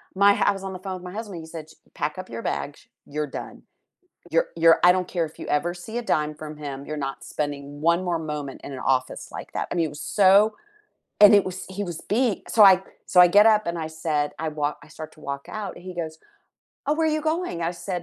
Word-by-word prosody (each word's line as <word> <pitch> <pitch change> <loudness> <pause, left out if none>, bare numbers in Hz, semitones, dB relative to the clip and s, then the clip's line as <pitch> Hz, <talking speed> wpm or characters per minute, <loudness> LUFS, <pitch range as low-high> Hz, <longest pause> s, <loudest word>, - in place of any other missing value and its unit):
my 200 +1 +6
h - - -4
I - - +5
was 195 - -10
on 190 - -5
the 185 - -7
phone 190 - -3
with 180 - -8
my 205 - -8
husband, 205 -7 -6
he 160 - -11
said, 155 -2 -7
"Ch - - -15 0.3
pack 150 +1 0
up 185 - -8
your 115 0 -6
bags, 145 - -5 0.3
you're 150 0 -1
done. - - -11 0.8
You're - - +2
you're 165 0 +7
I - - +9
don't 180 -1 -1
care 170 -2 +2
if - - -22
you - - -7
ever 170 +4 0
see 220 +6 -7
a - - -6
dime 150 0 -1
from 155 -1 -7
him, 140 -1 -6
you're 155 - -4
not 135 - -8
spending 145 -2 -3 0.3
one 170 +2 +1
more 170 -1 0
moment 145 -2 -6
in 140 - -7
an 130 - -6 0.2
office 130 - -9
like - - -9
that," - - -2
I - - -2
mean, 170 -2 +2
it 145 - -11
was - - -6 0.2
so 200 +3 +6 0.7
and 205 - +10
it - - -3
was 185 0 -5
he - - -1
was 175 -4 -6
bei 230 -3 +1
so, 220 - +3
I 195 -2 +9 0.3
so, 180 - +4
I 180 - +8
get 205 +4 +6
up 215 -1 +4
and 170 - -3
I 160 - -3 0.2
said 150 -2 +2
I 160 - -2
wal 150 -1 -2
I - - -19
start 155 0 -9
to 155 - -19
walk 140 0 -4 0.2
out, 195 - -5
and 175 - -13
he - - -6
goes, 160 -1 -6 0.7
"Oh, 295 - +2
where 320 +1 +1
are 310 - +1
you - - -2
going?" 335 - -4
I 165 - 0
said, 180 0 -5
170 Hz, 265 wpm, -24 LUFS, 150-195 Hz, 0.8 s, and